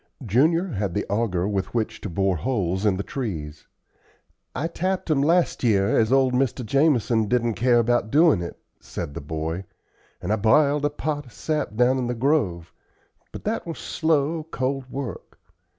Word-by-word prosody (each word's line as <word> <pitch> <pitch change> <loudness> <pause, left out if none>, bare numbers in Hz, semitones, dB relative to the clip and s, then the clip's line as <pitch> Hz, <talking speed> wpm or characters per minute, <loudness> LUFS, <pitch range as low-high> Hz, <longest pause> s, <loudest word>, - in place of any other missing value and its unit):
Junior 155 - +3
had 100 - -3
the 105 - -1
auger 100 -4 0
with 100 +2 -2
which 110 -2 -2
to 105 - -5
bore 95 +2 +1
holes 95 -2 -1
in 95 -2 +2
the 100 - -2
trees. 80 - -5 0.9
"I 145 - -2
tapped 185 +1 -2
'em 140 -3 +3
last 170 +2 +2
year, 100 -4 +3
as 110 +1 +2
old 135 -1 +4
Mr. 125 -1 0
Jamison 120 -4 +2
didn't 120 +1 +1
care 120 +5 +3
about 120 -1 +2
doin' 150 - +4
it," 85 - -6 0.2
said 80 -4 -6
the - - -6
boy, 80 +4 -4 0.6
"an' 90 - -3
I 110 - +2
b'iled 140 +7 +3
the 145 - +1
pot 145 -1 -4
of 120 - -16
sap 150 -8 -2
down 125 +3 +3
in 125 - -1
the 120 - -2
grove; 115 - 0 0.6
but - - -9
that 215 -3 -2
was 165 - -5
slow, 160 0 0
cold 135 -3 -3
work. 130 -7 -6
120 Hz, 175 wpm, -24 LUFS, 100-145 Hz, 0.9 s, old